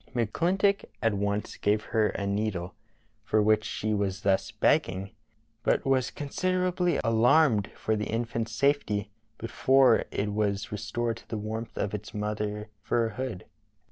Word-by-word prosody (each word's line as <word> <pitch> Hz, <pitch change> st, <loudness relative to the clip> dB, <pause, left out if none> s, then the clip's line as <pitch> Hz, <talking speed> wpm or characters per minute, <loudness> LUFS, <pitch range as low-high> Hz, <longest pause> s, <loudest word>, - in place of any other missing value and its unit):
" -, -, -26 dB
McClin 145 Hz, -, +1 dB
tock 200 Hz, 0 st, +3 dB, 0.2 s
at 115 Hz, -1 st, +3 dB
once 100 Hz, +1 st, -2 dB
gave 105 Hz, +1 st, +1 dB
her 110 Hz, -2 st, +4 dB
a 100 Hz, -, -3 dB
needle, 100 Hz, -3 st, -2 dB, 0.5 s
for 110 Hz, -, +1 dB
which 110 Hz, 0 st, +3 dB
she 110 Hz, 0 st, -2 dB
was 100 Hz, -1 st, -1 dB
thus 95 Hz, -1 st, +1 dB
begging, 95 Hz, +1 st, +1 dB, 0.5 s
but -, -, +1 dB
was 130 Hz, -2 st, +2 dB
considerably 180 Hz, +3 st, 0 dB
alarmed 115 Hz, -1 st, +4 dB
for 110 Hz, -, -1 dB
the 105 Hz, 0 st, -2 dB
infant's 115 Hz, 0 st, -2 dB
safety 110 Hz, -6 st, 0 dB, 0.3 s
before 130 Hz, +1 st, +3 dB
it 105 Hz, 0 st, -2 dB
was 105 Hz, +1 st, -1 dB
restored 115 Hz, +2 st, -2 dB
to -, -, -16 dB
the 110 Hz, -, -3 dB
warmth 110 Hz, +2 st, -5 dB
of 100 Hz, -, -2 dB
its 105 Hz, 0 st, -6 dB
mother's 105 Hz, 0 st, -2 dB, 0.2 s
fur 115 Hz, -1 st, +1 dB
hood. 115 Hz, -4 st, -5 dB
110 Hz, 150 wpm, -28 LUFS, 105-120 Hz, 0.5 s, her